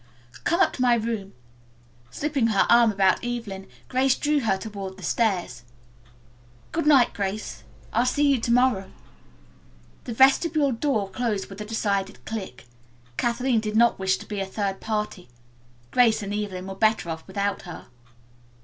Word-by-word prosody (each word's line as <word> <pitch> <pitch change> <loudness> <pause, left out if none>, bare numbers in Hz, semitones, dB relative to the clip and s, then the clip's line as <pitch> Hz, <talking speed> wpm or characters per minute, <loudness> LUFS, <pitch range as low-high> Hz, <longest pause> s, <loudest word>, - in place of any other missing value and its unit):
"Come 340 +2 +2
up - - +3
to - - -5
my 245 -1 +5
room." 225 -4 -3 0.8
Slipping 280 - 0
her 210 -3 +3
arm 235 -1 +6
about 195 -2 +2
Evelyn, 230 -6 -5 0.2
Grace 260 0 +2
drew 295 0 +1
her 225 -7 +1
toward 195 -2 -7
the - - -12
stairs. 185 - 0 1.1
"Good 325 -2 -1
night, 270 -5 +5
Grace, 200 - -4 0.3
I'll 235 +3 +2
see 285 +3 +2
you 275 -3 +3
to 235 - -1
morrow." 240 -6 +2 1.2
The 240 - -4
vestibule 280 +3 +4
door 230 -4 0
closed 205 0 -2
with 195 +2 -8
a - - -5
decided 205 -3 -2
click. 195 - -6 0.5
Kathleen 240 - +1
did 215 -1 -4
not 235 -1 +4
wish 190 0 +1
to - - -11
be 205 -2 -5
a 195 - -1
third 195 0 -3
party. 210 - -3 0.6
Grace 230 -4 +3
and 200 0 -4
Evelyn 200 -3 -4
were 195 - -6
better 215 -1 +1
off 160 0 -7
without 200 +1 -2
her. 170 - -9
220 Hz, 160 wpm, -25 LUFS, 195-245 Hz, 1.2 s, arm